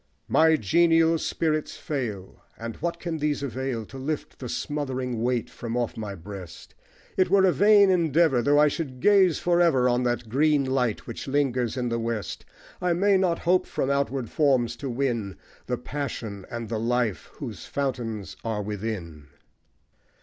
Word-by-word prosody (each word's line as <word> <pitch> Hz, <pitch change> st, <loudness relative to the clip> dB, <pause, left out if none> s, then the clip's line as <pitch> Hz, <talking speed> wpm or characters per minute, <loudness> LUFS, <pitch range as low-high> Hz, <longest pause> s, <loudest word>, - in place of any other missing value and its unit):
My 160 Hz, 0 st, +5 dB
genial 165 Hz, -, +3 dB
spirits 155 Hz, -1 st, -1 dB
fail; 110 Hz, -10 st, -5 dB, 0.2 s
And 115 Hz, 0 st, -6 dB
what 170 Hz, +1 st, -3 dB
can 170 Hz, -2 st, -4 dB
these 150 Hz, -1 st, -1 dB
avail 130 Hz, -3 st, -3 dB
To 135 Hz, -, -10 dB
lift 150 Hz, +3 st, -4 dB
the 125 Hz, -, -6 dB
smothering 130 Hz, -5 st, -3 dB
weight 120 Hz, -1 st, 0 dB
from 120 Hz, 0 st, -5 dB
off 120 Hz, -2 st, -1 dB
my 105 Hz, -3 st, -5 dB
breast? 95 Hz, 0 st, -10 dB, 0.4 s
It 185 Hz, -, +3 dB
were 195 Hz, 0 st, +5 dB
a 185 Hz, -, +5 dB
vain 205 Hz, 0 st, +6 dB
endeavour, 165 Hz, -6 st, +3 dB
Though 145 Hz, +4 st, +3 dB
I 150 Hz, 0 st, +6 dB
should 140 Hz, -4 st, -4 dB
gaze 190 Hz, -1 st, +5 dB
for 175 Hz, 0 st, +2 dB
ever 135 Hz, -8 st, +4 dB
On 125 Hz, 0 st, +2 dB
that 120 Hz, -1 st, -1 dB
green 145 Hz, +4 st, +2 dB
light 125 Hz, -5 st, 0 dB
that 115 Hz, -, -7 dB
lingers 130 Hz, -4 st, 0 dB
in 125 Hz, -1 st, -1 dB
the 115 Hz, 0 st, -1 dB
west 115 Hz, -2 st, -4 dB, 0.4 s
I 180 Hz, -1 st, +2 dB
may 195 Hz, +3 st, +3 dB
not 185 Hz, -3 st, +2 dB
hope 180 Hz, +1 st, +3 dB
from 135 Hz, -, -1 dB
outward 140 Hz, -4 st, -1 dB
forms 130 Hz, -6 st, +2 dB
to 135 Hz, -, -5 dB
win 120 Hz, -6 st, -2 dB, 0.3 s
The 125 Hz, -, -1 dB
passion 115 Hz, -8 st, -5 dB
and 115 Hz, -1 st, -5 dB
the 110 Hz, 0 st, -2 dB
life 120 Hz, -2 st, -1 dB
whose -, -, -8 dB
fountains 120 Hz, -7 st, -3 dB
are 110 Hz, -2 st, -2 dB
within. 95 Hz, -8 st, -5 dB
130 Hz, 165 wpm, -26 LUFS, 115-155 Hz, 0.4 s, vain